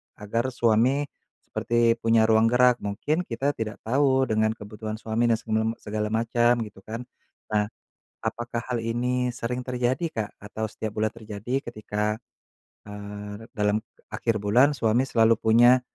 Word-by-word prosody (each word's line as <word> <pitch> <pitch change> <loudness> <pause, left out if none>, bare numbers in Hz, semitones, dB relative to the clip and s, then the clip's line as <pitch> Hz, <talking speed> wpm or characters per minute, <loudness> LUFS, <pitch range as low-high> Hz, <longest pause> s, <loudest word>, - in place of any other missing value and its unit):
agar 115 +4 -2
suami 120 +5 +3 0.4
seperti 120 0 +1
punya 115 -1 +4
ruang 110 0 +5
gerak. 125 +1 +4
Mungkin 150 - -2
kita 135 +4 0
tidak 110 -5 -6
tahu 130 +2 +3
dengan 110 -2 +1
kebutuhan 110 0 -6
suami 110 +2 0
dan 115 - +4
semelem 110 0 -1
segala 105 0 -3
macem 115 +2 +2
gitu 105 -3 -11
kan. 115 +3 -5 0.5
Nah, 105 -1 +2 0.6
apakah 120 +1 -3
hal 120 - 0
ini 125 +2 0
sering 125 +2 -2
terjadi, 125 +4 -1
Kak? 110 -8 -4
Atau 105 +2 -5
setiap 110 -1 -5
bulan 110 +1 +1
terjadi 115 +3 -4
ketika, 105 -2 -3 0.7
eee, 105 +1 -8
dalam 105 0 +2 0.3
akhir 115 -2 0
bulan 125 +8 +4
suami 120 +3 +2
selalu 115 -2 +4
punya 120 +3 +6
115 Hz, 145 wpm, -26 LUFS, 110-120 Hz, 0.7 s, punya